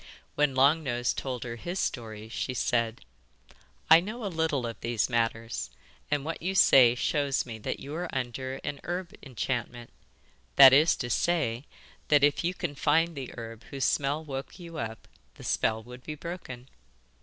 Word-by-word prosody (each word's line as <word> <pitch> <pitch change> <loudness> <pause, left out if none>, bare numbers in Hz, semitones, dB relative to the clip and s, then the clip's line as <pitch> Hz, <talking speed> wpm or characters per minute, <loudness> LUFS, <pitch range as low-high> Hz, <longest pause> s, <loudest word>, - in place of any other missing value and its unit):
When 145 -2 +1
Long 140 +5 +5
Nose 120 -4 -1
told 130 -3 -4
her 120 -1 -6
his 175 +9 -5
story 110 - -3
she 125 +3 -4
said: 115 -2 0 0.9
'I 160 - +11
know 215 +6 -6
a 195 - -3
little 160 -6 0
of 115 -1 -6
these 115 0 0
matters, 115 -1 -1 0.4
and 145 -1 0
what 165 +1 -4
you 185 +3 -2
say 125 -9 +7
shows 140 +1 0
me 115 -3 -7
that - - -4
you 140 - -8
are 175 +2 -3
under 130 +1 -4
a 140 - -4
herb 175 0 -4
enchantment 120 -2 -4 0.6
that 135 -1 +10
is 155 +4 +5
to 120 - -4
say, 145 -7 0 0.4
that 145 -1 +4
if 145 +2 +3
you 175 +2 -1
can 175 -5 -3
find 160 +3 +2
the 135 -3 -6
herb 115 -1 -8
whose 135 -1 -3
smell 145 +3 0
woke 135 -3 -6
you 170 -3 -8
up 110 -2 -6 0.3
the - - -13
spell 110 0 0
would 125 +1 -11
be 155 - -6
broken. 145 -7 -8
135 Hz, 175 wpm, -28 LUFS, 120-160 Hz, 0.9 s, I